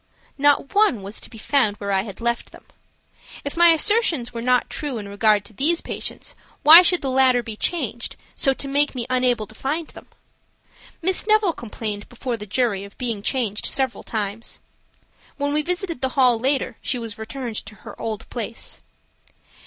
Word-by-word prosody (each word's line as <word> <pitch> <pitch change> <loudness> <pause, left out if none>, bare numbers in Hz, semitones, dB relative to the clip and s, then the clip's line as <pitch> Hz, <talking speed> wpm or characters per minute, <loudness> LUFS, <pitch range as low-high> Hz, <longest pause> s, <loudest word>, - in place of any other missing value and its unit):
Not 285 +1 +2
one 405 - +3
was 200 +3 -5
to - - -11
be 225 - -12
found 220 -3 +1
where 200 -1 -4
I 190 -1 +2
had 200 -2 -9
left 235 0 -2
them. - - -16 0.8
If 285 - -4
my 345 0 +6
assertions 330 - +3
were 230 - -4
not 250 +1 +2
true 290 -5 -4
in 205 -2 -6
regard 205 0 +2
to 215 - -12
these 325 - +2
patients, - - -5 0.3
why 320 +4 +11
should 360 -2 +2
the 270 - -1
latter 255 -2 +4
be 225 -2 -6
changed, 245 - -2 0.2
so 270 - +3
to 270 +1 -4
make 285 +1 +1
me 240 -2 -2
unable 250 -3 +2
to 220 - -16
find 295 +7 -3
them? - - -13 1.0
Miss 375 +4 0
Neville 430 -5 +4
complained 215 -4 -5
before 245 0 -4
the 210 -2 -8
jury 205 -2 0
of 200 0 -13
being 230 -5 -2
changed 215 -3 0
several 265 -3 0
times. 215 0 -4 0.8
When 285 0 -1
we 300 - +2
visited 350 -2 -3
the 265 - +1
hall 250 -3 +5
later 270 +3 0
she 255 - -1
was 225 -3 -6
returned 230 0 -5
to 215 - -10
her - - -10
old 220 -2 -4
place. 230 -1 -6
250 Hz, 185 wpm, -22 LUFS, 220-290 Hz, 1.0 s, why